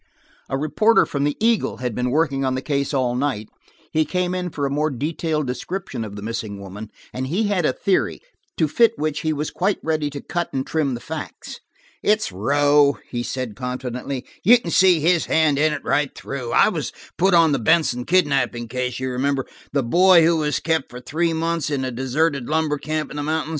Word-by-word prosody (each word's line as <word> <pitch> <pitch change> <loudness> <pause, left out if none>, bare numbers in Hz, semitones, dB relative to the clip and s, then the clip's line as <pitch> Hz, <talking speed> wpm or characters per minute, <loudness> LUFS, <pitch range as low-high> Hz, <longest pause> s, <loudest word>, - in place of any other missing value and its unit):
A 135 - -1
reporter 215 +10 +3
for 140 - -4
the 145 +1 0
Eagle 230 -1 +1
had 125 -2 -3
been 125 +3 -1
working 140 -1 +1
on 130 -1 0
the 130 - -2
case 140 -2 -1
all 130 -4 +1
night: 125 -5 -2 0.4
he 155 - +3
came 180 +3 -1
in 180 -1 -2
for 145 -3 -3
a - - 0
more 150 +2 +1
detailed 155 +3 -2
description 130 +1 -4
of 105 -2 -7
the 100 - -7
missing 110 -2 -4
woman, 100 +2 -8 0.2
and 130 +1 -3
he 180 +10 0
had 180 -6 +1
a - - +1
theory, 195 +7 0 0.4
to 160 - +2
fit 230 +8 +3
which 155 -1 -1
he 155 - -1
was 150 0 -2
quite 195 +2 0
ready 155 -2 0
to 145 0 -6
cut 175 +4 -3
and 135 0 -1
trim 145 -5 0
the - - -6
facts. 160 -1 -7 0.4
"It's 210 - +1
Rowe," 145 +7 +3
he 120 - -2
said 125 -3 -4
confidently. 125 +2 -4 0.2
"You 240 +6 +7
can 175 -8 -6
see 185 -2 +5
his 170 +1 +2
hand 155 -3 +3
in 155 +1 +3
it 150 -1 -4
right 145 -2 +1
through. 125 -4 -5
I - - +5
was - - -3 0.3
put 190 +1 +4
on 165 -2 +5
the 140 - +1
Benson 125 +1 +2
kidnapping 135 -9 +1
case, 125 0 -3
you 130 0 -2
remember, 135 +1 0 0.3
the 140 -1 +1
boy 175 +6 +6
who 165 0 +3
was 150 -1 0
kept 160 -3 -1
for 125 - -9
three 165 +6 -1
months 165 -1 -1
in 140 -3 -1
a 130 - -3
deserted 135 +2 -1
lumber 155 -2 0
camp 155 0 -3
in - - -7
the - - -2
mountains? 155 +1 -1
145 Hz, 210 wpm, -22 LUFS, 130-160 Hz, 0.4 s, You